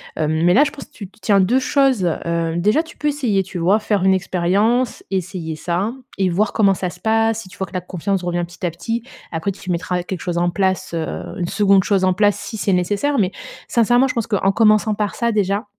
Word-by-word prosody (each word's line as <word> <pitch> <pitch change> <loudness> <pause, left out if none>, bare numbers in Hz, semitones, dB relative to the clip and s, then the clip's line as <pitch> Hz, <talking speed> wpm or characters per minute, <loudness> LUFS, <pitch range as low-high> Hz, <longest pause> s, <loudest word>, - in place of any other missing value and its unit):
Hem, 155 +1 0
mais 175 +1 +4
là, 275 - +7
je 285 - -1
pense - - -11
tu 200 - -9
tu 215 +4 -26
tiens 205 -2 +3
2 220 +8 +3
choses, 265 -5 +2 0.2
heu, 170 -1 -1
déjà 210 - +3
tu 335 +1 -14
peux 295 - 0
essayer, 240 -10 0
tu 185 -1 -7
vois? 185 +5 +3
Faire 210 -3 0
une 190 0 +4
expérience 195 +7 0
essayer 180 -4 -3
ça 180 +7 -2 0.2
et 190 -1 +1
voir 200 +4 +1
comment 200 -3 +3
ça 185 -1 -3
se 180 - -13
passe, 225 +1 +1
si 185 - -13
tu - - -15
vois 190 - -2
que 175 - -18
la 185 - -2
confiance 185 +1 -3
revient, 175 0 -1
petit 175 +1 -7
à 175 - 0
petit, 225 +7 -4 0.3
après 165 +5 -2
tu 185 -1 -10
mettras 180 +1 -1
quelque 180 +1 -6
chose 175 -1 -2
en 175 0 +2
place, 185 0 -1
heu, 160 - -1 0.3
une 175 -2 -2
2de 200 -2 +3
chose 195 -2 +2
en 185 - +3
place 205 +2 +2
si 220 - -6
c'est 200 -2 0
nécessaire, 205 +11 0
mais, 190 -2 +1 0.4
sincèrement 240 +3 +3
je - - -4
pense 230 -3 0
qu'en 195 -3 +1
commençant 215 0 +3
par 210 -1 -2
ça 235 -1 0
déjà, 205 0 0
195 Hz, 240 wpm, -20 LUFS, 180-220 Hz, 0.4 s, là